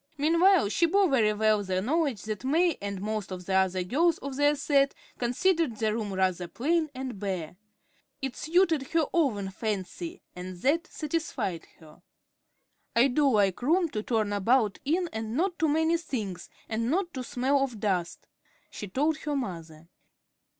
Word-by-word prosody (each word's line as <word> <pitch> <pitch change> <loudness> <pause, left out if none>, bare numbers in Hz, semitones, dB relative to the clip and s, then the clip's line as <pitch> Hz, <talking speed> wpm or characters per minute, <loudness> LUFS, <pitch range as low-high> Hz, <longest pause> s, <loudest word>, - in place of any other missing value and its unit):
Meanwhile, 335 - +4
she 335 +10 +2
bore 395 +3 +3
very 235 -8 +3
well 215 -1 +2
the 185 -1 -1
knowledge 275 - 0
that 215 0 -5
May 330 +5 +2
and 200 -1 -4
most 215 -2 -3
of 180 -1 -6
the 190 - -2
other 190 -1 +2
girls 320 - +2
of 275 -1 -6
their 290 +1 +3
set 280 -1 +2 0.2
considered 255 - +1
her 220 -2 +1
room 215 -2 -3
rather 185 -2 0
"plain 315 - 0
and 255 -5 -5
bare." 185 -5 -4 0.6
It 270 -2 -4
suited 320 -4 +2
her 325 -2 +3
own 215 - +1
fancy, 220 - -4
and 180 0 -7
that 330 +6 +2
satisfied 290 - -3
her. 160 +1 -17 0.9
"I 240 +4 +5
do 280 +2 +3
like 205 -5 +2
room 335 +6 +2
to 215 -7 -3
turn 215 -2 0
about 215 +1 +2
in 345 +5 +1
and 220 +2 -3
not 355 +1 0
too 320 - +2
many 320 +3 +2
things, 215 - -5 0.2
and 230 +1 -1
not 350 +3 0
to 255 - -4
smell 265 +3 +1
of 245 -5 -4
dust," 185 -5 -2 0.4
she 205 - -6
told 295 +10 0
her 295 -2 -3
mother. 165 - -5
245 Hz, 165 wpm, -28 LUFS, 200-315 Hz, 0.9 s, I